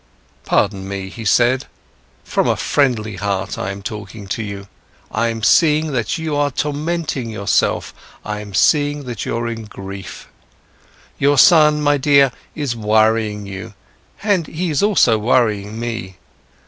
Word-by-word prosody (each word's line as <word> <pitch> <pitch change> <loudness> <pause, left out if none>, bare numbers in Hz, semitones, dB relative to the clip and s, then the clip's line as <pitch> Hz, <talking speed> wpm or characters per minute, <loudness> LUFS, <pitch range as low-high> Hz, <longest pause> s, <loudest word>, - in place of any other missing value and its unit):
"Pardon 95 -2 0
me," 95 -1 -5
he 115 +4 -8
said, 120 +5 +2 0.6
"from - - 0
a - - +2
friendly 110 -8 0
heart, 100 -2 -2
I'm 100 +1 -4
talking 105 0 -7
to 115 - -2
you. 100 -2 -6 0.4
I'm 115 0 -1
seeing 155 +4 +4
that 120 0 -1
you 160 -2 -3
are 145 0 +2
tormenting 150 -2 -2
yourself, 105 -2 0 0.3
I'm 105 -2 -5
seeing 145 - +2
that 120 -5 -5
you're 115 0 -2
in 115 -1 -5
grief. 100 -2 -9 0.9
Your 145 +1 +3
son, 150 -3 +6
my 145 0 +3
dear, 140 -1 +4 0.2
is 145 -6 -2
worrying 110 -1 +1
you, 100 +2 -8 0.5
and 195 -7 +1
he 170 +1 -3
is 145 - +1
also 185 - +4
worrying 110 -2 +1
me. 115 -5 -5
115 Hz, 135 wpm, -19 LUFS, 105-145 Hz, 0.9 s, son